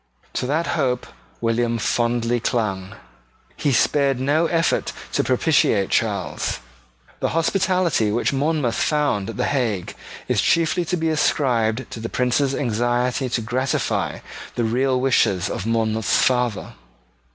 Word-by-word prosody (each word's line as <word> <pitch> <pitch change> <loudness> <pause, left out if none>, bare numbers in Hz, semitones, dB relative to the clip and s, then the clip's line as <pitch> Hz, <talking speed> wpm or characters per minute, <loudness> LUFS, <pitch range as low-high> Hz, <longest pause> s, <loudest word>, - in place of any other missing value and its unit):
To 125 - -2
that 155 +5 0
hope 125 -5 0 0.4
William 115 0 +1
fondly 120 +1 0
clung. 100 -5 -2 0.6
He 145 - 0
spared 135 +1 +2
no 145 +5 +2
effort 165 -1 0 0.2
to - - +2
propitiate 125 - +2
Charles. 100 -5 -1 0.6
The - - 0
hospitality 180 - +1
which 120 +5 0
Monmouth 145 -3 0
found 145 -9 0
at 115 - -7
the - - 0
Hague 115 -10 -1 0.3
is 125 -5 +2
chiefly 170 - +2
to 180 +2 -1
be 160 -1 0
ascribed 125 -6 +1
to - - -6
the 115 - -5
Prince's 130 +2 +1
anxiety 120 +1 0
to 120 - -1
gratify 125 +4 -1 0.3
the 120 - 0
real 130 +3 +1
wishes 105 -8 +2
of 100 - -4
Monmouth's 110 -1 +1
father. 125 -4 +1
125 Hz, 130 wpm, -22 LUFS, 115-145 Hz, 0.6 s, spared